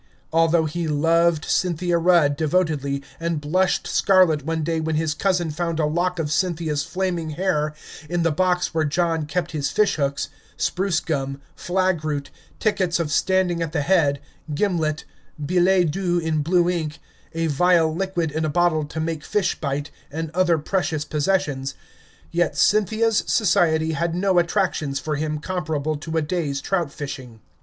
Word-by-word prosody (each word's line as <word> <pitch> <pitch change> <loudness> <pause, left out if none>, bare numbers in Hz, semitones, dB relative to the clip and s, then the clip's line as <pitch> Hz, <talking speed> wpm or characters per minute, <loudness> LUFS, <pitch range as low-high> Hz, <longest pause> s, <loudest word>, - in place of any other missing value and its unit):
Although 165 0 +3
he 165 +2 -3
loved 165 +1 +2
Cynthia 175 -1 +1
Rudd 165 -4 +4
devotedly, 150 -3 0 0.2
and 165 -2 -1
blushed 180 +6 +1
scarlet 185 -7 +3
one 160 +1 -2
day 165 +1 -1
when 160 0 -1
his 155 0 0
cousin 175 -1 0
found 165 +1 -2
a 155 - +2
lock 175 +4 0
of 155 -3 -2
Cynthia's 160 -3 0
flaming 180 -3 -2
hair 155 -5 0 0.3
in 175 -1 0
the 165 - +2
box 180 +2 +1
where 160 -1 +1
John 160 0 0
kept 175 +2 -2
his 145 -3 -1
fishhooks, 140 -6 0 0.3
spruce 190 -1 0
gum, 135 -3 -3 0.2
flag 185 -2 0
root, 145 -3 -3 0.3
tickets 190 -5 +1
of 160 -3 -2
standing 185 -1 +1
at 165 -2 -3
the 155 - +1
head, 145 -5 +2 0.4
gimlet, 160 -4 0 0.3
billets 180 +2 +3
doux 175 0 0
in 160 -2 0
blue 175 +3 +2
ink, 160 -3 -2 0.4
a 165 0 0
vile 160 +1 +3
liquid 175 -4 -1
in 160 +2 -2
a 155 - 0
bottle 160 -1 +2
to 155 +2 -6
make 160 -2 -3
fish 205 -3 0
bite, 145 0 -3 0.2
and 160 +1 -4
other 175 -1 +2
precious 155 -1 -1
possessions, 150 -4 -1 0.6
yet 175 +1 0
Cynthia's 215 +2 +3
society 170 -6 +2
had 165 +1 -1
no 185 0 +3
attractions 170 -6 0
for 150 +1 -3
him 150 0 -2
comparable 155 -3 -2
to 160 +2 -4
a 160 - +1
day's 150 -4 -2
trout 170 0 -1
fishing. 130 -6 -7
165 Hz, 160 wpm, -23 LUFS, 150-180 Hz, 0.6 s, Rudd